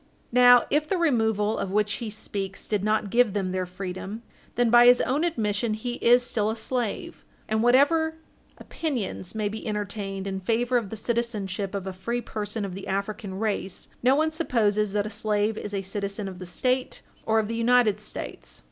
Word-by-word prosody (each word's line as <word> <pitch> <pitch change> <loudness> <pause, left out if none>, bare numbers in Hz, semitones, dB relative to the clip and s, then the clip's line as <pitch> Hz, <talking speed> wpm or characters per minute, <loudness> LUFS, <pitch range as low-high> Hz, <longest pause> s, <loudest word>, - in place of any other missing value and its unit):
Now 245 0 +7
if 305 +2 +1
the 385 - +1
removal 220 - +1
of 195 - -2
which 210 +1 +1
he 230 - -3
speaks 200 -2 -4
did 210 -3 -1
not 215 -1 0
give 240 -4 +4
them 190 -3 -1
their 185 -1 -2
freedom, 190 +4 -6 0.3
then, 240 -1 +2
by 240 0 +8
his 245 0 +7
own 285 +5 0
admission, 220 -9 0
he 240 +3 -4
is 245 +1 +5
still 215 -3 0
a 220 - -1
slave, 230 -1 -3 0.2
and 220 0 +1
whatever 290 +7 +4 0.4
opinions 235 - -4
may 215 -1 0
be 220 +2 -6
entertained 200 -2 -3
in 195 -1 -3
favor 235 +5 +1
of 225 -5 -2
the 220 - -5
citizenship 210 -4 -2
of 195 -1 -3
a 190 - -4
free 210 +6 -3
person 210 -2 -4
of 190 - -6
the 195 +1 -7
African 200 0 -3
race, 200 -3 -2
no 255 +3 +4
one 315 +2 +2
supposes 215 - +1
that 205 -1 +1
a 215 - -5
slave 210 0 0
is 210 - -6
a 195 -1 -2
citizen 200 +1 -4
of 185 -2 -8
the 180 - -7
State 255 +7 -1 0.2
or 220 0 +3
of 220 -1 +2
the 230 - -3
United 230 -3 +3
States. 210 - -6
215 Hz, 190 wpm, -26 LUFS, 200-240 Hz, 0.4 s, by